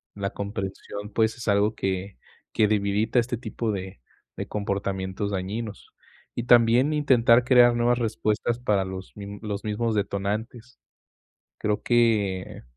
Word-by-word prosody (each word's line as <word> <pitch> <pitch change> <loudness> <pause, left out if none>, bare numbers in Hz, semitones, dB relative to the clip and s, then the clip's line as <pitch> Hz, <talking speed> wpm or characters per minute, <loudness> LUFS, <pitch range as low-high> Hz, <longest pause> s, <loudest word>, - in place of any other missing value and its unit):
la 100 0 -3
comprensión, 100 0 -5
pues, 110 +1 +1
es 115 - -8
algo 100 +2 +3
que 95 +1 -3 0.4
que 110 - +3
dividita 105 +2 0
este 120 0 -1
tipo 110 -1 -3
de 95 -5 -6 0.4
de - - -3
comportamientos 100 -1 -3
dañinos. 100 +3 -5 0.5
Y - - -1
también 120 +4 +5
intentar 125 -5 +4
crear 120 -2 +6
nuevas 120 +1 +2
respuestas 115 +1 -1
para 105 -6 +1
los 95 0 -7
mi 100 0 -8
los 105 -2 -4
mismos 110 +1 -1
detonantes. 105 +5 -3 0.8
Creo 105 0 -1
que 105 -6 +1
105 Hz, 130 wpm, -25 LUFS, 100-115 Hz, 0.8 s, crear